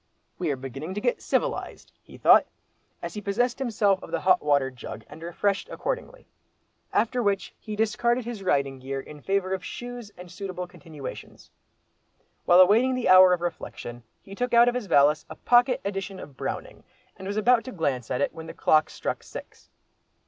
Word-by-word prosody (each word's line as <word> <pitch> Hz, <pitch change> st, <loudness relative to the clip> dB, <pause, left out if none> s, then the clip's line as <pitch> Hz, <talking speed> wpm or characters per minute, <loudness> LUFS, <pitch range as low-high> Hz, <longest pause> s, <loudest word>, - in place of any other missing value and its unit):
"We 175 Hz, -3 st, -1 dB
are 140 Hz, -, 0 dB
beginning 135 Hz, +7 st, -7 dB
to -, -, -1 dB
get 245 Hz, +3 st, 0 dB
civilised," -, -, -2 dB
he -, -, -15 dB
thought, -, -, +6 dB, 0.6 s
as -, -, -5 dB
he 210 Hz, -, -5 dB
possessed 235 Hz, +5 st, 0 dB
himself 210 Hz, -6 st, +1 dB
of -, -, -10 dB
the -, -, -2 dB
hot 185 Hz, -1 st, +4 dB
water 140 Hz, -3 st, +2 dB
jug, 115 Hz, -3 st, -9 dB
and 150 Hz, +2 st, -12 dB
refreshed 195 Hz, +4 st, -1 dB
accordingly. -, -, -5 dB, 0.7 s
After 245 Hz, +2 st, +1 dB
which 200 Hz, -3 st, -1 dB
he 215 Hz, -1 st, -6 dB
discarded 235 Hz, +3 st, +1 dB
his 235 Hz, -4 st, -6 dB
riding 140 Hz, -7 st, 0 dB
gear 135 Hz, +1 st, -4 dB
in 150 Hz, +2 st, -11 dB
favour 195 Hz, +1 st, 0 dB
of 190 Hz, -1 st, -3 dB
shoes 245 Hz, -3 st, -7 dB
and 180 Hz, -1 st, -11 dB
suitable 185 Hz, -1 st, -5 dB
continuations. 160 Hz, -5 st, -10 dB, 0.9 s
While 175 Hz, +1 st, +7 dB
awaiting 230 Hz, +8 st, +5 dB
the 250 Hz, -6 st, -1 dB
hour 185 Hz, 0 st, +9 dB
of 180 Hz, -1 st, +1 dB
reflection, 120 Hz, -8 st, -6 dB, 0.2 s
he 195 Hz, -, -11 dB
took 245 Hz, +3 st, -1 dB
out 235 Hz, +1 st, +7 dB
of 245 Hz, -, +3 dB
his 245 Hz, -4 st, -3 dB
valise 145 Hz, -1 st, +4 dB
a -, -, -8 dB
pocket 245 Hz, +1 st, +3 dB
edition 195 Hz, -1 st, -4 dB
of 140 Hz, -, -11 dB
Browning, -, -, -5 dB, 0.3 s
and 190 Hz, -, -9 dB
was 205 Hz, +1 st, -3 dB
about 235 Hz, +2 st, +4 dB
to 255 Hz, -, -6 dB
glance 140 Hz, -, -2 dB
at 125 Hz, +1 st, -1 dB
it -, -, 0 dB
when 160 Hz, 0 st, -9 dB
the -, -, -9 dB
clock 155 Hz, 0 st, +3 dB
struck -, -, -4 dB
six. -, -, -11 dB
190 Hz, 185 wpm, -26 LUFS, 155-230 Hz, 0.9 s, hour